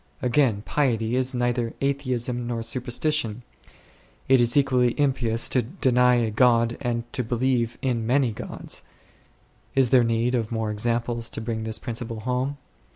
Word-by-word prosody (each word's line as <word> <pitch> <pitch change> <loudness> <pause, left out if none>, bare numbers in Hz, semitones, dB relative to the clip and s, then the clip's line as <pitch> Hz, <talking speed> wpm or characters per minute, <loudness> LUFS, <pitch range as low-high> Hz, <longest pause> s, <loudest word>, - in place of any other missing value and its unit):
Again, 120 -4 +1
piety 120 -5 0
is 130 +1 +1
neither 120 -1 -1
atheism 130 -3 -1
nor 115 -1 -3
superstition; 125 0 -1 0.8
it 130 -1 +5
is 120 +3 +4
equally 125 -2 +2
impious 120 -5 +1
to 130 - +2
deny 125 - +2
a 115 -2 0
God 115 0 +3
and 120 -3 -1
to 125 - -1
believe 120 0 0
in 120 -4 -1
many 130 -1 +2
gods. 105 - -5 0.9
Is 130 -3 +3
there 125 -2 +6
need 115 +1 0
of 115 -3 -1
more 110 -2 -2
examples 115 +2 -1
to - - -4
bring 110 -1 -4
this 110 0 -2
principle 115 -1 -6
home 130 +4 -2
120 Hz, 150 wpm, -24 LUFS, 115-130 Hz, 0.9 s, there